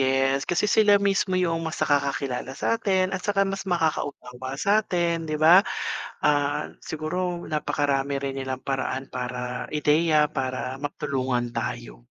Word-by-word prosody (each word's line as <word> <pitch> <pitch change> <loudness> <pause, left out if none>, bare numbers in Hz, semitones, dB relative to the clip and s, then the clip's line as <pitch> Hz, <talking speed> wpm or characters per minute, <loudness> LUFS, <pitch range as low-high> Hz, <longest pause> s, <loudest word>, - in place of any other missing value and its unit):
yes, 135 +1 +2
kasi 175 - +1
sila 210 -1 +5
mismo 195 -1 +1
yung 165 -2 +1
mas 160 - -6
nakakakilala 140 -2 -1
sa'tin 190 -3 +1
at 190 - -2
tsaka 195 0 +1
mas 195 0 -4
makakaunawa 135 -6 -2
sa'tin 175 -4 +1
'di 155 - -1
ba? 165 +5 +7 0.6
Ah, 145 -1 +1 0.2
siguro 175 +3 -3
napakarami 140 -2 0
rin 135 -1 -3
nilang 130 -1 -4
paraan 135 0 -3
para 125 0 -4
ideya 150 0 +3
para 130 -1 -3
matulungan 135 -4 -2
tayo. - - -5
145 Hz, 130 wpm, -25 LUFS, 135-175 Hz, 0.6 s, ba